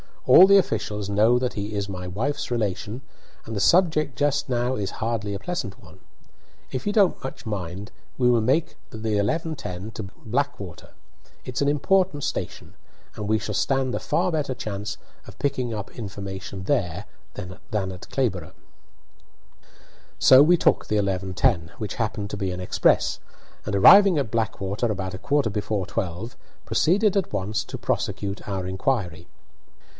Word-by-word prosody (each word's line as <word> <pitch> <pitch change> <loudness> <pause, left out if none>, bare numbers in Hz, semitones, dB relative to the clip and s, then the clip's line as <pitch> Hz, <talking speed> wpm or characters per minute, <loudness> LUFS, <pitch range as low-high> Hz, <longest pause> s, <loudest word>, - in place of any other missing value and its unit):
All 190 - +9
the 200 0 +7
officials 105 - -1
know 110 +4 +4
that 125 0 -1
he 105 +1 -4
is 100 -1 -2
my 90 -1 -5
wife's 115 +11 -2
relation, 110 0 -2 0.4
and 110 - -6
the - - -1
subject 155 - +3
just 145 0 +1
now 125 +1 0
is 100 -4 -3
hardly 110 -2 -1
a 100 - -4
pleasant 175 - -4
one. 90 +2 -16 0.7
If 130 +5 -4
you 205 - +1
don't 200 -4 +3
much 135 - -7
mind, 95 -2 -5 0.3
we 125 -1 +3
will 120 -2 +4
make 155 +8 +1
the - - -8
11:10 110 - -2
to 110 - -4 0.2
Blackwater. 110 - -3 0.5
It's 125 +1 -4
an 140 - +2
important 150 +1 +2
station, - - -4 0.4
and 105 - -5
we 110 +1 +3
shall 105 -1 -4
stand 135 +4 0
a - - -1
far 180 +1 0
better 145 -5 -1
chance 105 -2 -5 0.3
of - - -12
picking 130 -4 -1
up 105 -2 -5
information 95 -3 -6
there 90 +1 -1 0.3
than 95 -3 -7
at 95 -3 -5
Clayborough." 100 - -1 1.6
So 130 +1 +8
we 170 +5 +6
took - - +2
the 105 - +1
11:10, 95 -1 0
which 105 -3 -4
happened 105 -3 -2
to - - -4
be 95 -2 -2
an 90 - -5
express, 75 -8 +2 0.5
and, 105 - -2
arriving 195 - +8
at 135 -7 -1
Blackwater 110 -1 -1
about 95 -2 -4
a 95 - -6
quarter 145 -5 +1
before 105 -1 -2
twelve, 100 +2 -4 0.3
proceeded 200 +4 +2
at 190 - -1
once 105 +2 -1
to - - -7
prosecute 100 0 -3
our 95 -2 -3
inquiry. 95 - -2
110 Hz, 160 wpm, -24 LUFS, 100-135 Hz, 1.6 s, All